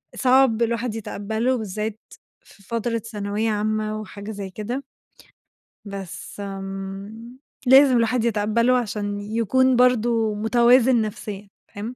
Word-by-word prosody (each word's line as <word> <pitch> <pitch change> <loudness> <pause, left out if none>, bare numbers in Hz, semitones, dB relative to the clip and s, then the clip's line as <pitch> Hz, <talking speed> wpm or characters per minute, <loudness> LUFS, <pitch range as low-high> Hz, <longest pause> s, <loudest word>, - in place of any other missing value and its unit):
صعب 255 -3 +3
الواحد 230 0 0
يتقبّله 220 +4 -2
بالذات 215 0 -4 0.4
في 200 - -20
فترة 230 +3 -2
ثانوية 210 0 -3
عامة 215 0 -1
وحاجة 205 +1 -8
زي 200 -2 -6
كده 235 +8 -5 1.0
بس 200 0 -8
آمم، 195 +4 -7 0.3
لازم 265 -1 +7
الوحد 230 0 +1
يتقبّله 230 +3 +2
عشان 205 -3 -3
يكون 230 +5 +2
برضو 235 -3 +3
متوازن 240 +3 +4
نَفسيًا، 205 -1 -6 0.2
فاهم؟ 220 +5 -6
220 Hz, 110 wpm, -23 LUFS, 205-240 Hz, 1.0 s, لازم